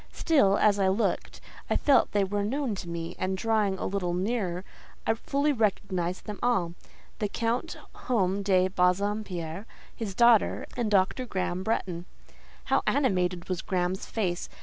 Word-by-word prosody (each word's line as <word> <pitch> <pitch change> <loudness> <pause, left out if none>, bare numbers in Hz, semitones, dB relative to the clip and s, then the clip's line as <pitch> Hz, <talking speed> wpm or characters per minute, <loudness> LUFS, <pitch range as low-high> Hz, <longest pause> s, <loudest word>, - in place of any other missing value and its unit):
Still, 205 - +3
as 205 -1 +3
I 195 - +3
looked, 195 +5 0 0.3
I - - +2
felt 285 - +4
they 205 -1 +2
were 205 +1 -1
known 260 +2 -1
to 185 -3 -6
me, 170 0 -5
and, 190 0 -1
drawing 215 -2 +1
a - - -4
little 180 -3 -1
nearer, 185 -2 -1 0.4
I 225 - +3
fully 280 +6 0
recognised 190 -6 -1
them 210 -1 -6
all: 190 -9 +1 0.5
the 210 - 0
Count 230 +3 -2 0.3
Home 200 -5 +2
de 185 -2 +3
Bassompierre, 185 -1 -1 0.3
his 205 -4 -5
daughter, 235 -1 +4
and 240 -4 -1
Dr. 205 +5 +2
Graham 185 -3 -2
Bretton. 185 -4 -2 0.6
How - - +2
animated 180 -10 +1
was 185 -2 -2
Graham's 185 0 -2
face! 185 -5 -2
195 Hz, 150 wpm, -28 LUFS, 180-225 Hz, 0.6 s, felt